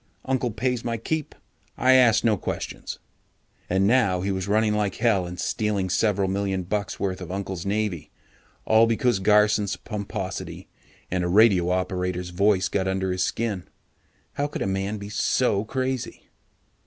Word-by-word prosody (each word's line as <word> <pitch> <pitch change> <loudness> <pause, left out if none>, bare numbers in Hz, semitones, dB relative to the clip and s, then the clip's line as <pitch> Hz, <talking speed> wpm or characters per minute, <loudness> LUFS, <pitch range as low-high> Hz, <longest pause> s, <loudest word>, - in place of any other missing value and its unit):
Uncle 130 -2 0
pays 120 +2 -2
my 115 -1 -2
keep. 155 +6 -3 0.4
I 130 0 +5
ask 115 -3 +5
no 110 -2 +3
questions." 95 - -5 0.7
And 95 +2 +2
now 100 -5 +3
he 100 +2 -1
was 95 0 -3
running 105 +1 +2
like 105 -3 0
hell 100 -7 +1
and 90 +1 -8
stealing 100 -4 -1
several 100 0 +2
million 95 -1 -1
bucks 100 +2 -3
worth 95 -2 -2
of - - -7
Uncle's 95 -1 -4
Navy, 105 -5 -2 0.6
all 110 +1 +5
because 115 -2 +1
Garson's 105 0 +3
pomposity 100 -3 -6 0.4
and 90 -1 0
a - - 0
radio 95 -2 +4
operator's 90 -1 -2
voice 95 +1 +2
got 95 0 -1
under 95 0 -1
his 90 0 0
skin. 105 -5 -2 0.7
How 145 0 -1
could 145 - -4
a - - -2
man 95 +2 -2
be 100 0 -8
so 110 -1 +1
crazy? 130 +1 -3
100 Hz, 155 wpm, -25 LUFS, 95-110 Hz, 0.7 s, I